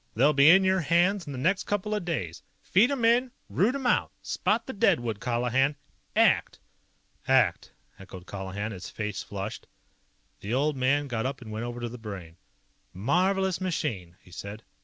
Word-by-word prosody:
They'll 140 +7 +4
be 140 +2 +6
in 190 +3 +7
your 190 0 +3
hands 175 +3 +2
in - - -5
the 135 - -6
next 185 +9 +1
couple 205 +1 -2
of 210 -3 -1
days. 95 - -3 0.2
Feed 215 +7 +4
'em 270 -5 0
in! 245 +3 +4 0.2
Root 230 +8 +2
'em 275 -2 -4
out! 245 - +2
Spot - - 0
the 265 - -6
deadwood, 120 - +1
Colihan! 125 +5 +1 0.4
ACT!" - - +3 0.7
"ACT!" - - +2 0.3
echoed 95 -2 -11
Colihan, 100 +2 -5
his 95 -3 -7
face 105 -2 -4
flushed. 100 +1 -6 0.7
The 105 +5 -3
old 145 +2 +1
man 140 +3 +1
got 120 -1 -2
up 135 0 -5
and 115 -4 -10
went 110 +2 -4
over 120 0 -5
to 120 - -3
the 120 +1 -9
Brain. 95 -7 -8 0.6
"Marvelous 185 - +1
machine," 115 - -3
he 90 - -18
said. 100 +4 -8
130 Hz, 175 wpm, -27 LUFS, -, 0.7 s, in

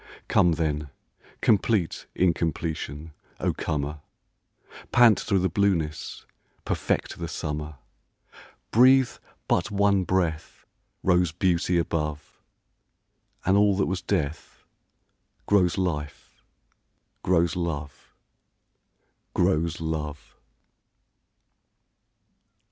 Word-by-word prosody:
Come 85 - +4
then, 75 -2 -2 0.5
complete 105 -4 +1
incompletion, 80 -3 -1 0.3
O - - 0
comer, 75 -1 -3 0.9
Pant 120 -4 +6
through 100 - 0
the 95 0 +2
blueness, 85 -5 -1 0.4
perfect - - -2
the 85 - -3
summer! 75 -1 -4 1.0
Breathe 130 +2 +6 0.4
but - - +1
one 100 -2 +2
breath 85 -4 -2 0.4
Rose 90 -2 +3
beauty 90 0 +1
above, 75 -3 -3 1.1
And 95 - +4
all 100 -1 +4
that 100 - +2
was 90 0 -2
death 75 +1 -3 0.8
Grows 95 -4 +3
life, 75 -6 -4 0.8
grows 85 0 +2
love, 80 -5 -4 1.3
Grows 80 +2 +1
love! 75 -2 -5
85 Hz, 80 wpm, -26 LUFS, 75-95 Hz, 1.3 s, Pant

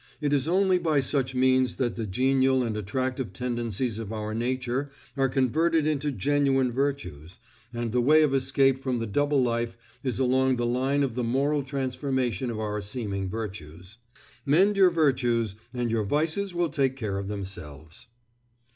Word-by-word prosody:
It 145 -1 0
is 140 0 +2
only 185 +1 +3
by 160 -4 +1
such 135 -1 -1
means 130 0 +3
that 120 -3 -1
the 115 -2 -4
genial 130 +4 +2
and 115 -3 -2
attractive 130 +5 -3
tendencies 120 -2 -2
of 110 -2 -6
our 110 -1 -4
nature 130 +3 -2 0.3
are 135 -1 +1
converted 155 +5 +1
into 150 -1 0
genuine 135 +2 +1
virtues, 115 - -3 0.3
and 120 -1 -3
the 125 +1 +2
way 155 +5 +5
of 145 -3 +1
escape 135 0 +2
from 130 -2 -1
the 115 - -2
double 145 +5 +1
life 120 -1 -1 0.3
is 130 -3 -1
along 130 0 +2
the 120 -1 -1
line 130 +4 +1
of 130 -4 -1
the 125 +1 -2
moral 140 +5 +1
transformation 130 -3 -2
of 110 -2 -4
our 105 -1 -3
seeming 100 -3 -3
virtues. 95 -3 -7 0.5
_Mend 190 +9 +4
your 190 -2 +6
virtues, 125 - +1 0.2
and 120 -2 -2
your 115 -1 +1
vices 160 - 0
will 170 -1 +1
take 135 -4 0
care 105 -6 -3
of 100 - -5
themselves. 90 - -7
130 Hz, 165 wpm, -26 LUFS, 115-140 Hz, 0.5 s, your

